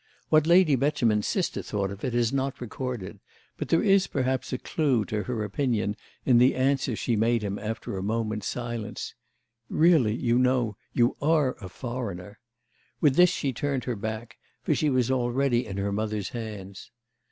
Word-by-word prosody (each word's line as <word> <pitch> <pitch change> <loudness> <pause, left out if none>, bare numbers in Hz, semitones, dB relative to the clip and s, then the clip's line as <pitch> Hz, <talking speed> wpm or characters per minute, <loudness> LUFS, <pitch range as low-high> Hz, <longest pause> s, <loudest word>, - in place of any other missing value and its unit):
What 155 0 +4
Lady 170 -4 +6
Beauchemin's 120 -6 +1
sister 185 - -1
thought 100 -2 -2
of 100 0 -9
it 125 -2 -1
is 120 0 +1
not 135 -1 -1
recorded; 120 -4 -5 0.4
but - - -4
there 165 - +3
is 195 -2 +4
perhaps 130 -2 -1
a 130 - -1
clue 130 -7 0
to 105 -1 -2
her 120 -4 -2
opinion 105 -1 -1 0.3
in 125 -3 +5
the 125 +2 +5
answer 130 -2 +1
she 115 +2 -1
made 115 +1 +2
him 100 0 -3
after 110 -1 -4
a 95 - -3
moment's 110 0 -2
silence: 120 -3 -4 0.6
"Really, 155 -10 +4
you 120 0 +1
know, 125 -4 +2 0.2
you 120 +1 +2
are 150 -3 +3
a 95 - -7
foreigner!" 105 -4 -6 0.6
With 145 -4 +3
this 180 +2 +7
she 145 -7 -2
turned 140 +1 -2
her 125 - -2
back, 110 +1 -6 0.2
for - - +2
she 155 - +1
was 130 -2 +1
already 125 -1 +1
in 100 -2 -5
her 100 0 -1
mother's 105 -1 -2
hands. 105 -5 -7
120 Hz, 175 wpm, -27 LUFS, 105-135 Hz, 0.6 s, this